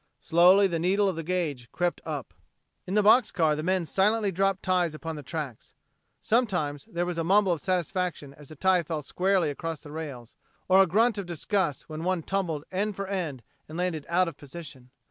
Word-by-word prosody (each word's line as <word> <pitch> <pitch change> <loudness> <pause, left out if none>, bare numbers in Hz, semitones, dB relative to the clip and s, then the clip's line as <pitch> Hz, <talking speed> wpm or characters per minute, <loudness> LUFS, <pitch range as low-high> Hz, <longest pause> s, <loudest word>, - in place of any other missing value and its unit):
Slowly 180 +4 +5
the 170 -4 0
needle 195 +4 +2
of 190 - 0
the 165 - -3
gauge 155 -8 -3
crept 175 0 -1
up. - - -5 0.5
In 190 - -2
the 210 - +4
box 220 +3 +6
car 160 -4 +2
the 150 - -3
men 185 +1 0
silently 205 +5 +2
dropped 195 +1 0
ties 180 -4 +1
upon 160 +1 -5
the 150 - -7
tracks. 145 -5 -6 0.4
Sometimes 180 - 0
there 175 +1 -2
was 175 -1 -3
a - - 0
mumble 195 +2 +4
of 165 -4 -1
satisfaction 180 -4 -2
as 145 -1 -14
a 155 - -10
tie 185 +3 +3
fell 155 -2 -4
squarely 185 -1 +1
across 165 +2 -5
the 145 - -11
rails; 140 -7 -7 0.3
or 190 +1 +6
a 190 - +4
grunt 220 +5 +2
of 195 - -5
disgust 175 -2 -1
when 155 +1 -6
one 180 -2 0
tumbled 170 -6 -2
end 200 +2 -1
for 195 - -4
end 170 -10 -3 0.3
and 155 - -7
landed 175 -4 -2
out 180 +1 +3
of 170 - -6
position. 140 -4 -11
175 Hz, 205 wpm, -27 LUFS, 155-190 Hz, 0.5 s, box